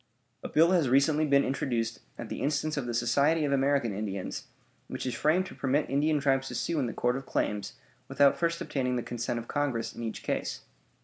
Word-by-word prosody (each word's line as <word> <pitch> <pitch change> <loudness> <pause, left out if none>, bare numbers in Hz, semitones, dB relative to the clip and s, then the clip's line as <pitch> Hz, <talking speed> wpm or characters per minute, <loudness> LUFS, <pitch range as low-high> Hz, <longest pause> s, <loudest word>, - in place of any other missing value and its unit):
A - - -6
bill 165 +3 +4
has 170 -8 +3
recently 150 +4 +3
been 140 -1 +4
introduced, 115 -4 -1 0.2
at - - -7
the - - -5
instance 150 +2 0
of 135 -4 -3
the 120 - -2
Society 140 +7 +2
of 140 - -1
American 135 -5 +1
Indians, 100 -2 -4 0.4
which - - -5
is 125 - -1
framed 160 +8 +2
to - - -9
permit 140 +2 0
Indian 150 +2 +2
tribes 135 -1 +1
to 125 - -6
sue 155 +7 -1
in 130 - 0
the - - -3
Court 120 +3 0
of 135 0 -6
Claims, 105 -1 -2 0.3
without 140 0 +4
first 170 0 0
obtaining 125 -2 -1
the 120 - -1
consent 120 0 -3
of 115 0 -6
Congress 140 -6 -1
in - - -8
each 115 -1 -5
case. - - -2
135 Hz, 210 wpm, -29 LUFS, 120-145 Hz, 0.4 s, bill